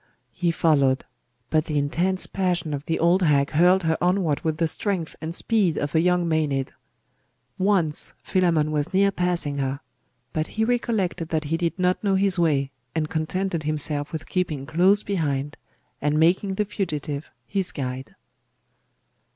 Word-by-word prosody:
He 175 - 0
followed: 140 -6 +2 0.5
but 155 0 +2
the 150 -2 -2
intense 175 +6 +1
passion 180 -5 -1
of 145 0 -4
the 165 - 0
old 175 +3 +3
hag 145 -4 +3
hurled 180 +4 +4
her 160 +1 0
onward 175 -5 +2
with 160 -1 -1
the 165 - +1
strength 180 -2 -2
and 165 +1 -4
speed 205 -8 +1
of 145 0 -2
a 160 - +4
young 180 0 +2
Maenad. 150 -4 0 0.9
Once 185 -6 +1
Philammon 165 -5 +2
was 150 +5 -1
near 200 +1 +4
passing 175 -6 0
her. 135 0 -2 0.5
But 155 0 -1
he 220 - +3
recollected 220 -9 -1
that 160 -1 0
he - - +4
did 170 +1 -1
not 180 +1 +1
know 195 -2 +2
his 190 -1 +2
way, 140 -5 +2 0.2
and 155 -1 -1
contented 170 +2 -1
himself 150 -1 0
with 160 -2 -6
keeping 155 -7 -2
close 185 +7 +3
behind, 145 -7 -2 0.5
and 150 +1 +1
making 185 +4 +2
the 210 - 0
fugitive 155 -7 -4 0.2
his 195 -2 -1
guide. 130 -1 -5
165 Hz, 160 wpm, -24 LUFS, 150-185 Hz, 0.9 s, hurled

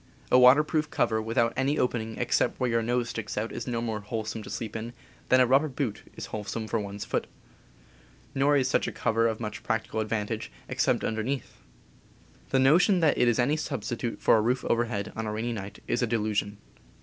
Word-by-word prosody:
A 125 - +7
water 125 +4 +7
proof 155 0 -1
cover 110 -1 +1
without 115 +1 +1
any 135 +3 +1
opening 115 -3 -1
except - - +1
where 125 -2 +1
your 115 0 +2
nose 120 +1 0
sticks 110 -2 -5
out 110 +2 -2
is 120 - -6
no 120 -2 -1
more 110 -2 -2
wholesome 110 +1 -4
to - - -10
sleep 110 -2 -5
in 115 +2 -5 0.4
than 130 - +6
a 130 - +6
rubber 135 +5 +4
boot 130 -6 -3
is - - -6
wholesome 110 +1 -4
for 115 - 0
one's 100 0 -5
foot. - - -2 1.1
Nor 140 +2 +3
is 130 -2 +2
such - - +1
a - - -2
cover 115 +1 +1
of 110 -1 -2
much 105 -4 -5
practical 110 -1 -2
advantage, 110 0 -2 0.2
except - - +1
underneath. 115 +5 -3 0.9
The 135 - +2
notion 170 +9 +5
that 160 - +4
it 125 - +3
is 120 - +3
any 140 +5 +2
substitute 120 -5 -3
for - - +5
a - - +3
roof 125 +4 0
overhead, 115 -3 -1
on 115 -1 -3
a - - -2
rainy 115 +3 -2
night, 100 -2 -8
is 120 - 0
a 125 - +1
delusion. 105 -2 -1
115 Hz, 205 wpm, -27 LUFS, 110-125 Hz, 1.1 s, A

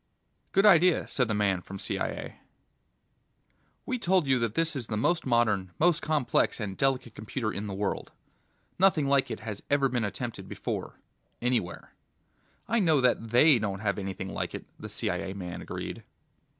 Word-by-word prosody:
"Good 195 +2 +3
idea," 180 -3 +5
said 125 -3 0
the 110 - -1
man 100 -3 +1
from 100 +2 -8
CIA. - - -4 1.5
"We 255 -1 -2
told 185 -4 +2
you 130 -2 +3
that 115 -2 -1
this 165 -1 +1
is 125 -5 -4
the 105 - -2
most 170 +7 +1
modern, 110 -6 +1
most 170 0 +3
complex 150 -6 +1
and 100 -3 -4
delicate 130 -3 0
computer 110 +1 -4
in 105 +1 -4
the 100 - -4
world... 100 0 -3 0.7
nothing 175 -7 +4
like 140 -1 +3
it - - -5
has 105 -3 -6
ever 140 -1 +3
been 120 -2 -1
attempted 110 +3 -4
before - - -5 0.4
anywhere." 120 -8 -2 0.7
"I 235 - +2
know 160 -7 +4
that 125 -3 +1
They 125 +3 +6
don't 100 -2 -3
have 100 -1 -1
anything 95 0 -5
like - - -3
it," - - -7
the - - -7
CIA 95 -1 -2
man 90 -3 -6
agreed. - - -6
120 Hz, 165 wpm, -28 LUFS, 100-150 Hz, 1.5 s, They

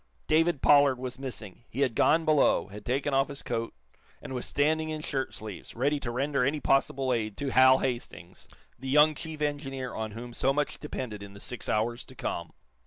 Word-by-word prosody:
David 160 -1 +2
Pollard 145 -2 +6
was 130 0 -6
missing. 120 -6 -7
He 135 - -4
had 130 -4 +2
gone 160 +8 +3
below, 155 -8 +3
had 105 +1 -9
taken 135 +5 -1
off 135 +1 +3
his 140 -1 -6
coat, 115 - -3 0.4
and - - -8
was 125 - -3
standing 155 +2 +1
in 155 -1 -4
shirt 135 -4 -2
sleeves, 105 -5 -8
ready 140 +5 +1
to 125 - -4
render 135 +2 0
any 145 +4 +1
possible 135 -2 +2
aid 110 -3 -2
to 140 - -2
Hal 130 0 +7
Hastings, 120 -9 -5 0.3
the 130 +1 -6
young 150 +3 +6
chief 155 0 -6
engineer 135 -3 -3
on 110 -1 -4
whom 120 +2 -8
so 135 +3 +1
much 150 +1 -1
depended 125 -8 -5
in 100 0 -10
the - - -11
six 125 +2 -4
hours 120 +3 0
to 130 - -13
come. 85 -7 -4
130 Hz, 200 wpm, -28 LUFS, 120-145 Hz, 0.4 s, Hal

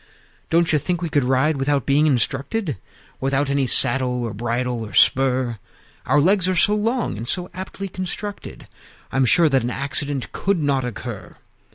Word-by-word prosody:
II. - - -32
"Don't 165 0 +2
you 150 - +3
think 175 +4 -2
we 170 - -2
could 145 -3 +2
ride 135 +4 +1
without 140 0 0
being 145 +3 +3
instructed, 140 - 0 0.4
Without 135 +1 0
any 140 -2 +1
saddle 125 -1 +3
or 115 -3 -4
bridle 120 +2 -2
or 105 - -9
spur? 130 -3 +3 0.5
Our - - +3
legs 185 +4 +3
are 185 - 0
so 205 +4 +4
long, 225 - -1
and 115 +3 -6
so 180 +5 -2
aptly 190 +1 -6
constructed, 185 +2 -7 0.4
I'm 135 0 +2
sure 165 +6 +5
that 135 -3 +2
an 120 - -2
accident 140 +1 -2
could 195 -2 -1
not 140 -3 0
occur. 125 -4 -7
140 Hz, 175 wpm, -21 LUFS, 125-170 Hz, 0.5 s, sure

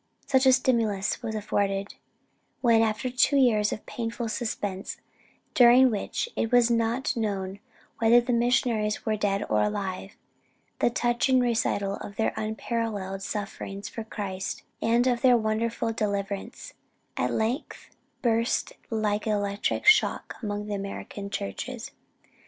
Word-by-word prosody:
"Such 265 -1 +3
a - - +8
stimulus 230 -7 +1
was 220 -2 -4
afforded, 200 -1 -1 0.7
when 230 -3 +5
after 220 +2 0
two 255 +3 +3
years 220 -6 +3
of - - -5
painful 230 0 -4
suspense, 205 -4 -3 0.6
during 250 +1 +7
which 210 - -2
it 225 - -1
was 240 -1 +5
not 235 +3 0
known 200 -4 -2 0.4
whether 230 +1 +6
the 245 +1 -1
missionaries 235 -3 +1
were 220 - +1
dead 205 -1 0
or - - +2
alive, 195 -2 -2 0.7
the - - +3
touching 240 +2 +2
recital 220 -5 0
of 200 - -9
their 220 - 0
unparalleled 215 -3 -3
sufferings 200 -1 -5
for 225 - -6
Christ's 195 -3 -5
sake, - - -36 0.2
and 235 +2 +3
of 245 -2 +1
their 250 -2 +6
wonderful 225 +1 -1
deliverance, 200 +1 -3 0.4
at - - 0
length 230 +7 -3 0.3
burst 230 0 +1 0.2
like 215 -1 -1
an 215 - +2
electric 205 0 -1
shock 425 0 +4
upon 205 -2 -3
the 210 - -4
American 200 0 -5
churches. 100 - -5
220 Hz, 135 wpm, -27 LUFS, 205-240 Hz, 0.7 s, a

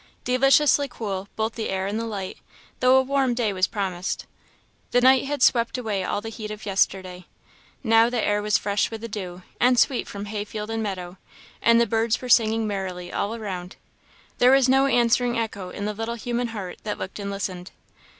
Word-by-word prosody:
Deliciously 275 +3 +4
cool, 200 -5 -5
both 220 0 -1
the 225 - -4
air 190 0 -1
and 205 +3 -2
the 230 - -3
light, 195 -4 -5 0.4
though 255 +1 +5
a 265 - +4
warm 265 -2 +1
day 225 -4 0
was 185 0 +2
promised. 185 -4 -3 0.6
The 245 - +3
night 260 +1 +5
had 285 -2 -1
swept 235 +1 +3
away 215 -6 -2
all 205 - -2
the 225 - -6
heat 215 -1 -7
of 215 0 -8
yesterday. 185 -2 -1 0.6
Now, 225 0 +5
the 245 -1 -1
air 205 -1 +1
was 210 -1 +2
fresh 200 0 0
with 225 -1 -7
the 230 - -5
dew, 185 -4 -7 0.2
and 250 0 +4
sweet 245 +2 +2
from 200 0 -6
hayfield 210 +1 -5
and 225 0 -2
meadow; 185 -3 -5 0.4
and 230 0 +5
the 235 - +4
birds 225 +1 +1
were 250 - -7
singing 225 -1 +4
merrily 185 -3 -4
all 210 +3 -1
around. 185 -5 -6 0.6
There 250 - +6
was 270 -1 +5
no 270 +1 +4
answering 240 -1 +2
echo 200 -5 -3
in 200 +2 -5
the 210 - -2
little 225 +2 -4
human 240 +1 -2
heart 200 -6 -7
that 210 -1 -4
looked 190 - -6
and 200 0 -4
listened. 185 -2 -4
220 Hz, 200 wpm, -24 LUFS, 195-240 Hz, 0.6 s, There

